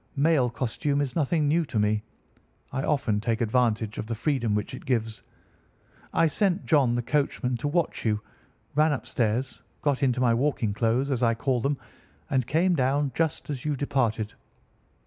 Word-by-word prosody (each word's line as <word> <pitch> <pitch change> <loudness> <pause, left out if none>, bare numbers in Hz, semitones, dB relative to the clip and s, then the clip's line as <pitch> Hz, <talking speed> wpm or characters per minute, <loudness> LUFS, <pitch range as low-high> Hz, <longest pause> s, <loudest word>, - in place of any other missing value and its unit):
Male 145 -3 +3
costume 140 +4 -1
is 140 -3 -2
nothing 155 -1 +1
new 165 +3 +3
to 120 - -4
me. 105 0 +2 0.7
I 135 - -2
often 125 -8 0
take 115 0 0
advantage 110 -2 +1
of 110 - -4
the 115 - -2
freedom 115 -3 0
which 105 +3 -2
it 130 - -8
gives. 115 -3 -1 0.9
I 165 - +3
sent 190 +3 +1
John, 135 -7 +3
the 120 - -1
coachman, 140 -2 0
to 130 - -3
watch 170 +3 0
you, 105 -2 +1 0.5
ran 150 +1 +3
upstairs, 125 -1 -1 0.2
got 145 -3 +1
into 125 -3 +2
my 120 -2 +3
walking 120 -4 0
clothes, 120 +6 +1
as 130 -3 0
I 115 -1 +3
call 125 0 0
them, 140 +2 0 0.5
and 130 -3 +1
came 175 +4 +2
down 140 +1 +1
just 160 -1 -1
as 130 -3 -4
you 150 -1 0
departed. 120 -6 -1
130 Hz, 170 wpm, -26 LUFS, 115-145 Hz, 0.9 s, Male